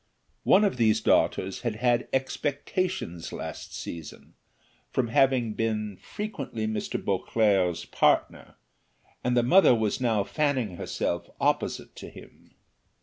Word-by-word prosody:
One 200 - +6
of 200 -10 +1
these 110 -2 +3
daughters 95 0 +1
had 120 -3 -2
had 120 +1 +1
expectations 140 - -2
last - - -7
season 80 -3 -8 0.6
from 125 -3 -1
having 125 -2 +3
been 105 -2 -2
frequently 135 - -5
Mr. 110 0 -3
Beauclerc's 95 -6 +1
partner, - - +1 0.7
and 125 0 +1
the 120 - +4
mother 170 0 +6
was 110 +1 -1
now 110 -5 +2
fanning 130 - -1
herself 85 0 -3
opposite - - -1
to - - -8
him. - - -16
115 Hz, 120 wpm, -27 LUFS, 105-135 Hz, 0.7 s, One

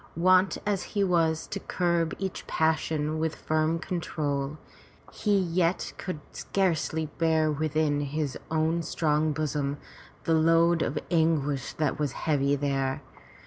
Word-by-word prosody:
Wont 185 +3 +4
as 205 -3 0 0.2
he 200 - +4
was 165 -4 +2
to 200 - -5
curb 170 -3 0
each 190 -1 -5
passion 155 -1 0
with 160 0 -1
a - - -17
firm 155 +1 +1
control, 150 -5 -2 0.5
he 205 -2 +1
yet 175 -1 0
could 180 -5 -4
scarcely 160 -4 0
bear 160 -1 +3
within 150 0 0
his 145 -1 -2
own 160 +1 +1
strong 155 -1 +1
bosom 145 -2 -1 0.5
the 165 - +1
load 165 +1 +4
of - - -1
anguish 150 -5 +1
that 155 0 -1
was 145 -4 -1
heavy 145 -2 +1
there. 135 -1 -1
160 Hz, 135 wpm, -28 LUFS, 150-170 Hz, 0.5 s, Wont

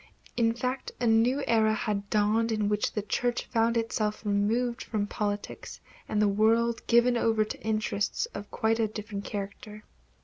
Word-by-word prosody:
In 230 -1 +2
fact 255 +2 -3
a 245 - 0
new 235 +5 +3
era 220 -1 +3
had 200 -2 -2
dawned 215 +2 +2
in 215 -2 0
which 210 0 0
the 210 - -2
Church 240 +3 -1
found 230 0 +1
itself 215 -1 -1
removed 230 +5 0
from 210 -2 -2
politics 205 0 -4 0.3
and 210 - 0
the 210 - +4
world 225 +3 +2
given 240 +1 +4
over 225 -2 +2
to - - -7
interests 215 -1 -1
of 205 0 -7
quite 225 +1 0
a 225 - +2
different 210 -1 -6
character. 210 +1 -6
220 Hz, 165 wpm, -28 LUFS, 210-230 Hz, 0.3 s, the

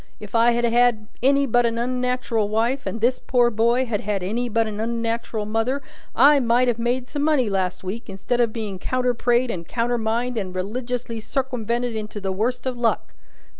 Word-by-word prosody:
If 210 -2 -10
I 230 +1 +5
had 240 0 +1
had 235 -2 +2
any 280 +2 +4
but 245 -1 +3
a 235 - +3
unnat'ral 245 -2 -1
wife, 235 +6 0
and 225 - -4
this 250 +2 +2
poor 245 -2 +2
boy 235 +4 +2
had 220 -4 -2
had 200 -2 -2
any 235 +6 -2
but 225 0 +2
a 215 - -4
unnat'ral 230 0 -2
mother, 225 +6 0 0.4
I 285 +3 +6
might 245 0 +3
have 240 -1 0
made 245 +2 -1
some 290 +1 -4
money 285 -8 +2
last 185 -1 -1
week 210 +5 -5
instead 220 +6 -1
of 230 -2 +2
being 215 -4 -5
counter 250 +4 0
prayed 240 +1 +1
and 170 -4 -6
countermined 235 0 -1
and 185 -2 -5
religiously 235 +4 -3
circumwented 240 -1 -2
into 215 -1 -5
the 195 -1 -2
worst 225 +8 -1
of 255 -2 -3
luck. 230 -1 0
235 Hz, 190 wpm, -23 LUFS, 215-250 Hz, 0.4 s, I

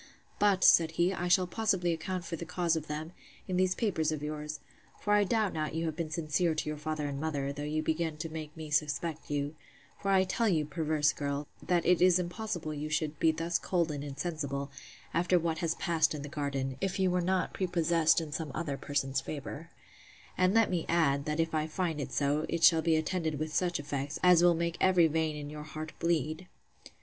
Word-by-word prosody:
But, 200 -2 +3
said 165 -1 +6
he, 175 +3 +2
I 180 -1 -2
shall 180 +1 +4
possibly 185 -3 0
account 175 +2 -4
for 170 - -4
the 165 - -6
cause 170 -1 0
of 160 -1 -4
them, 155 +2 -5 0.4
in 185 - -2
these 185 0 +2
papers 160 -8 0
of 150 -2 -4
yours; 150 0 -4 0.4
for 205 - 0
I 205 0 +5
doubt 215 -1 +1
not 155 -1 -3
you 165 +1 -1
have 160 -2 -2
been 165 -1 -3
sincere 160 +1 0
to 155 - -2
your 150 - -4
father 155 -1 -3
and 140 0 -4
mother, 140 -3 -2
though 145 - -7
you 155 +1 -1
begin 160 0 -1
to 160 - -4
make 155 -1 -7
me 155 -1 -7
suspect 150 +2 -1
you: 145 0 -1 0.5
For 195 - -2
I 190 -1 +5
tell 215 +5 0
you, 155 -5 +2
perverse 155 -1 +1
girl, 140 0 -3
that 175 -2 +1
it 180 -1 +4
is 180 -1 +6
impossible 180 -3 -3
you 150 +1 -4
should 155 -1 -1
be 160 - +4
thus 165 +2 -1
cold 170 -3 0
and 145 -1 -4
insensible, 145 -1 -4 0.4
after 175 +2 +3
what 165 -1 -1
has 165 -2 0
passed 160 -2 +1
in 145 - -6
the 145 - -6
garden, 140 -3 -3
if 195 0 -1
you 190 -2 +2
were 180 0 +1
not 185 +1 0
prepossessed 170 -3 +2
in 160 -2 -6
some 155 -1 -4
other 150 -4 -2
person's 135 -2 -1
favour: 150 +3 -7 0.7
And 185 +3 +2
let 225 -3 +4
me 175 -3 0
add, 140 -5 +2
that 150 +1 -2
if 165 0 0
I 155 0 0
find 160 -2 -2
it 135 - -5
so, 145 +2 0
it 170 -1 -2
shall 165 -1 +7
be 165 0 +2
attended 160 -1 -1
with 155 +1 -4
such 175 -1 +1
effects, 140 0 -3
as 180 -2 +7
will 175 -1 +5
make 170 0 -2
every 185 -3 +5
vein 160 -1 0
in 145 -1 -6
your 150 0 -7
heart 155 +1 -7
bleed. 165 +1 -1
160 Hz, 220 wpm, -31 LUFS, 150-175 Hz, 0.7 s, shall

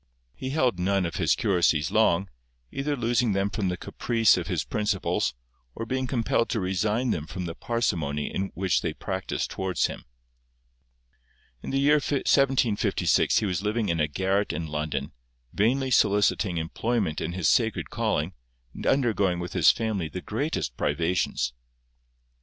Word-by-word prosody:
He 130 - -6
held 130 - +1
none 95 +1 +1
of 85 -1 -4
his 80 -4 +2
curacies 85 - +2
long, 100 -4 +3 0.4
either 145 +1 -2
losing 120 -2 +1
them 100 +1 0
from 100 -4 -1
the 90 - -2
caprice 115 +1 +2
of - - -3
his - - -1
principals, 105 - -1 0.4
or 115 - -4
being 130 +2 -2
compelled 115 -2 0
to 115 - 0
resign 105 +6 0
them 80 -1 -3
from 90 -1 -5
the 85 - -4
parsimony 80 -11 -2 0.2
which 95 -3 +1
they - - -2
practised 95 -1 -3
towards 95 -4 0
him. - - -5 1.6
In - - -7
the 135 - 0
year 145 +2 +5
1756 135 -5 +2
he - - +2
was 95 -2 -1
living 105 +1 -1
in 85 -1 0
a 75 - +2
garret 95 +6 0
in 80 +1 -3
London, 75 -2 -3 0.4
vainly 130 +6 +1
soliciting 100 -4 +3
employment 90 +1 -1
in 85 - -3
his 90 -2 0
sacred 115 -2 +1
calling, 105 -7 -1 0.4
and - - -5
undergoing 105 -9 +2
with 90 0 -5
his 85 -5 +5
family 105 -8 0
the 90 - -5
greatest 110 - -3
privations. 80 -4 0
100 Hz, 155 wpm, -26 LUFS, 85-115 Hz, 1.6 s, year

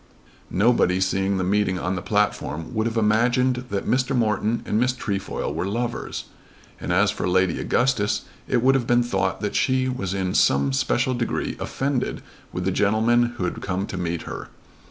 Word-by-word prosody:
Nobody 95 -3 +3
seeing 95 +1 +1
the 95 - 0
meeting 95 0 +1
on 90 +1 -2
the 90 - -3
platform 100 -6 -1
would 110 +1 0
have 115 0 -3
imagined 120 +4 +2
that 100 -1 -2
Mr. 130 +2 +1
Morton 110 -1 +1
and 105 - 0
Miss 125 +1 +2
Trefoil 100 -6 -3
were 90 - -2
lovers, 120 +4 -3 0.6
and - - -4
as 100 +3 +3
for 95 - -2
Lady 95 -1 +2
Augustus 120 -5 +1 0.2
it 120 -1 +1
would 135 +1 +5
have 130 -3 0
been 120 0 +4
thought 95 -5 -1
that 105 - -2
she 130 -1 +2
was 100 -7 -2
in 95 -1 -1
some 70 0 +3
special 125 - +1
degree 120 -1 -2
offended 135 -2 -2 0.3
with 90 - -4
the 95 - +1
gentleman 115 +5 +2
who 95 - -2
had 90 - -3
come 95 +1 -2
to 100 - -7
meet 85 -2 -2
her. - - -7
105 Hz, 180 wpm, -23 LUFS, 95-120 Hz, 0.6 s, would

